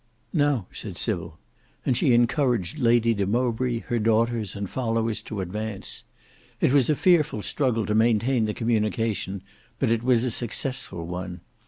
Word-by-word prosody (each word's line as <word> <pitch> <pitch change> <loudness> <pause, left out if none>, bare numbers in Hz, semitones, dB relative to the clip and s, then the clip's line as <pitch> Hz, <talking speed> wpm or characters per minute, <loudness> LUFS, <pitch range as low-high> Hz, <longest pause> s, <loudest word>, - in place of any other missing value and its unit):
"Now," 145 - +2
said - - -6
Sybil, - - 0 0.5
and 130 - +2
she 130 +2 +2
encouraged 120 - +1
Lady 115 -2 +4
de 100 -3 -1
Mowbray, 120 +1 0
her 120 - -2
daughters, 115 -1 +1
and 100 -1 -4
followers 115 -1 -1
to 105 -3 -5
advance. 105 +2 -5 0.5
It 130 - +3
was 140 -2 +4
a 150 - +4
fearful 155 - +2
struggle 125 -6 0
to 105 - -1
maintain 115 +2 +3
the 105 - -3
communication, 110 -4 -1 0.3
but 130 -4 +1
it 115 -1 +2
was 120 -1 +3
a 125 - 0
successful 120 -5 -2
one. 90 +1 -6
115 Hz, 155 wpm, -25 LUFS, 105-125 Hz, 0.5 s, Lady